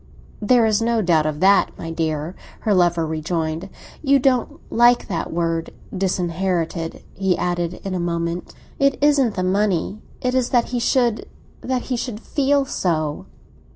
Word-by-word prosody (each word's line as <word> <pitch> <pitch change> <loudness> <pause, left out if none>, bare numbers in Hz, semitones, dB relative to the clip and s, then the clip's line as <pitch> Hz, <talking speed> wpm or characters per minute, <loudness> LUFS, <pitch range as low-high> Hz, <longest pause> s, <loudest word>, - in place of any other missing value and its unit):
"There 230 +2 +4
is 215 0 +2
no 230 -1 +1
doubt 160 -4 +3
of 150 -1 -3
that, 195 +1 +4
my 165 - -6
dear!" 160 +1 -2 0.3
her 215 - +1
lover 175 -3 +3
rejoined. 160 +2 -3 0.3
"You 280 -2 +4
don't 260 -2 +1
like 240 +1 +4
that 170 -5 -3
word 165 -1 -1 0.3
'disinherited,'" 180 -2 -1
he 190 -2 0
added 175 -1 -1
in 195 - -4
a 185 - -1
moment. 170 0 -2 0.3
"It 275 -1 +3
isn't 280 -6 +3
the 185 - -1
money; 195 +1 0 0.2
it 250 0 -1
is 255 -2 +1
that 240 -2 +2
he 245 - -1
should—that 245 +1 -1
he 255 - -2
should 235 -3 -4
feel 280 +2 +1
so." 155 - -2
190 Hz, 155 wpm, -21 LUFS, 170-240 Hz, 0.3 s, There